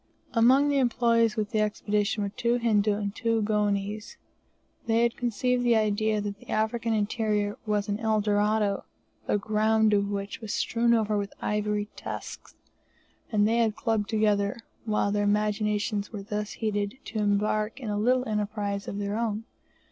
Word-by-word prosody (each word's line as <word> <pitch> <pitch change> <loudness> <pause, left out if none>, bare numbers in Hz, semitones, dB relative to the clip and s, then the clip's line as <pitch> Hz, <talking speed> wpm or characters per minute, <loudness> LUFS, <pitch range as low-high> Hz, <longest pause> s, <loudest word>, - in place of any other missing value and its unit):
Among 260 +5 +5
the 285 -1 +2
employees 230 -3 +2
with 210 -2 -2
the 215 - +1
Expedition 210 0 0
were 200 - -1
two 235 +4 0
Hindi 220 -3 +2
and 205 -1 -1
two 230 -1 0
Goanese. 210 0 -1 0.7
They 230 +1 +3
had 235 -1 +1
conceived 245 +1 0
the 240 -1 +4
idea 215 0 +1
that 205 0 -4
the - - -18
African 225 +2 0
interior 210 -1 0
was 210 -1 0
an 205 0 -2
El 220 -1 +1
Dorado, 210 0 +1 0.4
the - - +2
ground 215 +1 +2
of 200 0 +2
which 200 +3 -4
was 220 -2 -3
strewn 235 0 +2
over 215 -2 +1
with 200 0 -5
ivory 210 0 -1
tusks, - - -7 0.8
and 210 -1 +3
they 230 +1 +2
had 225 -3 +2
clubbed 220 -2 -1
together; 210 -2 +1 0.3
while 210 -2 +1
their 205 0 +1
imaginations 210 0 0
were 205 -3 -6
thus 210 +1 -4
heated, 205 +1 -2
to 220 - -4
embark 210 +2 0
in 230 -5 -4
a 205 - -1
little 250 +3 +2
enterprise 205 -1 -2
of 200 - -4
their 205 0 -2
own. 220 -1 -1
210 Hz, 165 wpm, -27 LUFS, 205-225 Hz, 0.8 s, Among